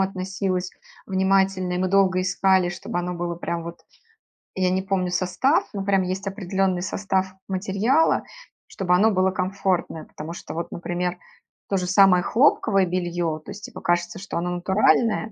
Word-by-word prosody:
относилась 190 -1 -2 0.4
внимательно. 190 -1 +1
И - - -1
мы 185 0 0
долго 190 -1 +3
искали, 190 -1 +2
чтобы 175 0 -4
оно 180 0 -3
было 175 0 -3
прям 170 -1 -4
вот, 170 0 -8 0.8
я 185 -1 +1
не 190 +1 0
помню 190 -2 -1
состав, 185 - +1
но 195 - -3
прям 195 -1 +2
есть 185 +2 -4
определённый 190 -2 -1
состав 190 0 -1
материала, 200 +10 +1 0.4
чтобы 180 -2 -1
оно 210 +5 +4
было 190 0 +2
комфортное. 185 -3 -1
Потому 155 +2 -8
что - - -8
вот, 170 +1 -5
например, 175 +1 -3 0.5
то 195 - +1
же 180 -1 -2
самое 190 -1 +5
хлопковое 215 -6 +3
бельё, 175 -3 -2
то 155 - -15
есть 205 +1 -9
типа - - -10
кажется, 175 +1 0
что 190 -3 -5
оно 175 +1 -2
натуральное, 210 +5 +2
185 Hz, 160 wpm, -23 LUFS, 180-195 Hz, 0.8 s, самое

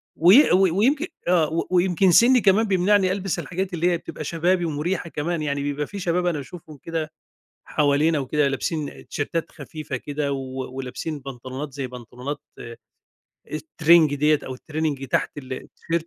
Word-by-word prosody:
وي 190 - +6
وي 185 0 +4
ويمكن 265 - +2 0.2
آه 165 -2 +2
ويمكن 185 +1 +3
سني 245 +7 +6
كمان 205 +3 +4
بيمنعني 190 0 +3
ألبس 195 -1 -2
الحاجات 185 +1 -4
اللي 175 +1 +1
هي 170 - +1
بتبقى 155 - -8
شبابي 175 +3 +1
ومريحة 165 +3 -2
كمان 165 +2 -2
يعني، 140 -2 -2
بيبقى 145 0 -2
في 200 - -7
شباب 180 -1 0
أنا 175 -3 +1
باشوفهم 155 +1 -10
كده 160 -2 -3 0.5
حوالينا 150 +2 +2
وكده، 140 +2 +1
لابسين 145 +2 -3
تيشيرتات 160 +3 -3
خفيفة 155 -4 -6
كده 145 +2 -3
و 130 -1 -5
ولابسين 135 +4 -5
بنطلونات 130 +1 -7
زي 135 -1 -4
بنطلونات 125 +3 -7 1.1
الترينج 155 0 +3
ديّة 150 +1 +3
أو 130 - -5
الtraining 150 -1 -3
تحت - - 0
ال 130 -2 -8
التيشيرت، 165 +5 -4
155 Hz, 155 wpm, -23 LUFS, 140-180 Hz, 1.1 s, وي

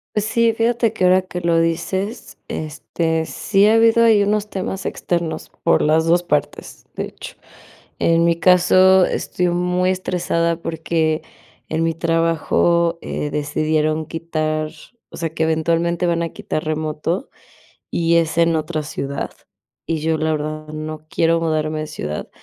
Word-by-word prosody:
Sí, 225 +2 +2
fíjate 230 0 +1
que 185 - -3
ahora 185 +1 +5
que 180 -1 -6
lo 170 -1 +2
dices, 175 +6 -2
este, 160 +1 -2
sí 200 +4 +2
ha 220 - +5
habido 230 +1 +5
ahí 215 -3 +5
unos 210 +1 0
temas 190 0 -4
externos 170 -2 -3
por 170 - +3
las 160 +2 +3
2 175 +1 +3
partes, 150 -4 -3
de - - -2
hecho. - - -10 0.6
En 165 0 +3
mi 170 0 +3
caso, 185 +1 +5
estoy 180 -1 -1
muy 180 +1 +1
estresada 170 -2 -1
porque 160 -1 -1 0.5
en 160 +1 0
mi 165 0 +1
trabajo, 165 +1 +1
eh, 150 - -3
decidieron 155 +1 0
quitar 155 -2 -2 0.4
o - - -10
sea, 165 -2 -2
que 160 - -1
eventualmente 165 +2 +1
van 170 0 +1
a 165 - -2
quitar 155 - -4
remoto, 155 - -2 0.6
y 170 0 +2
es 165 -1 +1
en 165 -1 +4
otra 155 0 -2
ciudad, 140 -1 -4 0.6
y 165 -1 -1
yo 160 +1 0
la 155 0 0
verdad 155 0 -4
no 155 0 -6
quiero 165 0 +2
mudarme 155 -1 -1
de 155 - -4
ciudad, 75 - -5
165 Hz, 150 wpm, -20 LUFS, 155-180 Hz, 0.6 s, ahora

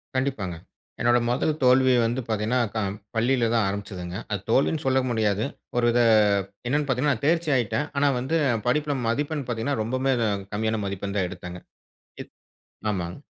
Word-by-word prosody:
கண்டிப்பாங்க. 130 -10 -1 0.5
என்னோட 120 +1 +4
முதல் 135 +5 +1
தோல்வி 130 0 +5
வந்து 120 +3 -1
பார்த்தீங்கன்னா, 110 +3 0 0.2
க 110 - -1 0.4
பள்ளியில 120 +1 +2
தான் 115 - +3
ஆரம்பிச்சுதுங்க. 95 -3 -5
அது 100 - -1
தோல்வின்னு 145 +6 +2
சொல்ல 130 0 +3
முடியாது. 110 -2 +1 0.3
ஒரு 120 - +3
வித 120 - +2 0.7
என்னன்னு 145 +3 +1
பார்த்தீங்கன்னா 135 +2 +2
நான் 110 - -12
தேர்ச்சி 165 +1 +2
ஆயிட்டன். 130 +5 0
ஆனா, 145 +1 +3
வந்து 145 +7 0 0.3
படிப்புல 145 +2 +1
மதிப்பெண் 145 +4 -1
பார்த்தீங்கன்னா 120 +2 -2
ரொம்பவே 130 +4 0
அ - - +1 0.2
கம்மியான 110 +1 0
மதிப்பெண் 100 +1 -4
தான் 90 - +1
எடுத்தாங்க. 90 0 -8 0.6
இத் - - -24 0.6
ஆமாங்க. 90 -3 -4
120 Hz, 155 wpm, -25 LUFS, 105-135 Hz, 0.7 s, தோல்வி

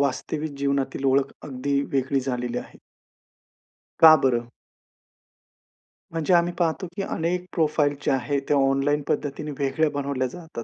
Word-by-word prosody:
वास्तविक 145 +3 -1
जीवनातील 140 -1 -1
ओळख 135 +1 +2
अगदी 140 0 -1
वेगळी 135 0 +1
झालेली 125 -2 -3
आहे. - - -10 1.2
का 160 -1 +10
बरं? 120 -3 +1 1.7
म्हणजे 165 +2 +1
आम्ही 175 0 +3
पाहतो 170 +2 0
की 200 - -2
अनेक 180 -1 -2
प्रोफाइल 150 -3 +1
जे - - 0
आहे, 140 +2 0
ते 140 +2 -1
ऑनलाईन 140 +1 +2
पद्धतीने 150 +1 -2
वेगळ्या 145 +3 +1
बनवल्या 140 -2 -2
जातात. 160 -3 -8
140 Hz, 130 wpm, -24 LUFS, 135-155 Hz, 1.7 s, का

